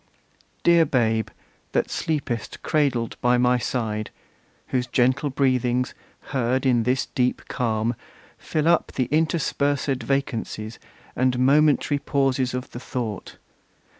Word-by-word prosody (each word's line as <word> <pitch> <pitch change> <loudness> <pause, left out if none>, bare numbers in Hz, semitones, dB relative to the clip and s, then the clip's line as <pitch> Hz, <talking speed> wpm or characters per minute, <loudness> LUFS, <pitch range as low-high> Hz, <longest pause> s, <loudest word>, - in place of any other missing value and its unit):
Dear 170 -1 +6
Babe, 115 -7 +1 0.4
that - - 0
sleepest 140 -8 -3
cradled 135 -7 0
by 125 0 +3
my 125 0 +3
side, 110 -4 -2 0.6
Whose 125 -1 0
gentle 130 +4 +2
breathings, 125 -2 +1 0.4
heard 130 +1 +1
in 125 -3 +3
this 125 +3 +1
deep 125 -1 0
calm, 115 -2 0 0.5
Fill 155 0 -1
up 170 -1 +2
the 130 - 0
interspersed 145 -4 +1
vacancies 115 -4 -3 0.4
And 130 0 +1
momentary 145 +2 +3
pauses 135 -2 0
of 125 0 -5
the 120 - -7
thought! 120 -6 -5
125 Hz, 115 wpm, -24 LUFS, 120-140 Hz, 0.6 s, Dear